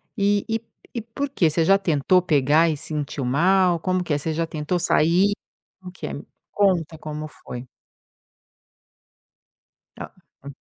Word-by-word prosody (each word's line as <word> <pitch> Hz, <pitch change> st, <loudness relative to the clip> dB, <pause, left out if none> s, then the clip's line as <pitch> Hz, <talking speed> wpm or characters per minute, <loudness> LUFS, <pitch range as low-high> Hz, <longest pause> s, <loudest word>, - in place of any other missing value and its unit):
E 205 Hz, -1 st, +1 dB
e 225 Hz, 0 st, -1 dB, 0.3 s
e 235 Hz, -, -3 dB
por 270 Hz, +6 st, -4 dB
quê? 170 Hz, -, +2 dB
Você 165 Hz, +2 st, +1 dB
já 195 Hz, +2 st, +5 dB
tentou 180 Hz, 0 st, +2 dB
pegar 155 Hz, 0 st, +3 dB
e 150 Hz, -, -1 dB
sentiu 145 Hz, -3 st, -4 dB
mal? 175 Hz, +5 st, +3 dB
Como 185 Hz, +1 st, 0 dB
que 160 Hz, -, -2 dB
é? -, -, +2 dB
Você 160 Hz, +2 st, -3 dB
já 165 Hz, +1 st, -1 dB
tentou 155 Hz, +3 st, -2 dB
sair? 180 Hz, +4 st, +3 dB, 0.5 s
Como 180 Hz, -1 st, -10 dB
que 180 Hz, -, -7 dB
é? -, -, -6 dB
Me 145 Hz, -, -8 dB, 0.3 s
conta 175 Hz, -6 st, +1 dB
como 155 Hz, 0 st, -6 dB
foi. 125 Hz, -4 st, -10 dB, 2.3 s
Tá, -, -, -8 dB, 0.3 s
hum. 140 Hz, -1 st, -8 dB
170 Hz, 155 wpm, -23 LUFS, 150-190 Hz, 2.3 s, já